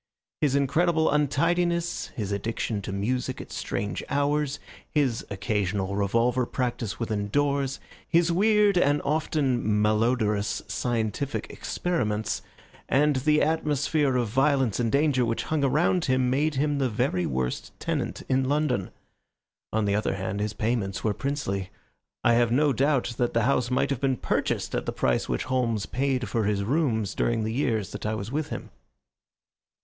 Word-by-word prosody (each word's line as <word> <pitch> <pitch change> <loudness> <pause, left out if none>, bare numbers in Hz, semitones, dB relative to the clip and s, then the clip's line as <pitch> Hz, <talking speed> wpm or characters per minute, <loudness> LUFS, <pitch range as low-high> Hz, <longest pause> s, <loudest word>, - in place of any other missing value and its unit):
His 140 -3 +2
incredible 160 +4 +2
untidiness, 170 +4 +1
his 105 -3 -3
addiction 105 +1 -2
to 95 - -5
music 125 +6 -2
at - - -9
strange 100 - -3
hours, 145 0 0 0.3
his 135 -7 +1
occasional 100 0 -1
revolver 115 +5 +1
practice 120 -5 -3
within 105 -3 -2
doors, 140 0 0 0.3
his 170 0 +3
weird 205 +1 +4
and 145 -2 +3
often 145 -4 0 0.2
malodorous 105 -1 +1
scientific 120 +3 -2
experiments, 110 - -2 0.5
and 145 +1 +3
the 150 +3 +3
atmosphere 150 -2 +1
of 120 -2 +1
violence 135 -2 +2
and 115 -2 +1
danger 140 -3 +3
which 115 -1 -1
hung 155 -2 -1
around 160 +6 +2
him 130 -1 +2
made 150 +3 +1
him 145 +1 +1
the 130 -2 +1
very 110 -5 0
worst 65 -1 -2
tenant - - -3
in 130 0 +1
London. 145 -9 0 0.8
On 110 -1 +1
the 100 - +1
other 105 -1 0
hand, 95 +1 -3
his 105 0 -1
payments 105 -3 -1
were 110 - +1
princely. 120 -9 -3 0.5
I 120 - +5
have 120 0 +3
no 145 +3 +3
doubt 135 -3 +1
that 120 -2 0
the 115 - +3
house 125 -2 +2
might 130 +2 +1
have 135 - -2
been 135 -2 +1
purchased - - -1
at - - -2
the - - 0
price 60 -1 0
which - - -1
Holmes 120 -5 0
paid 130 -1 -1
for 115 -3 0
his 100 -1 0
rooms 110 - 0
during 115 -2 0
the 110 +1 -2
years 115 - 0
that - - -5
I 110 - -1
was 110 +1 -5
with 150 +1 -2
him. - - -6
125 Hz, 155 wpm, -26 LUFS, 110-145 Hz, 0.8 s, I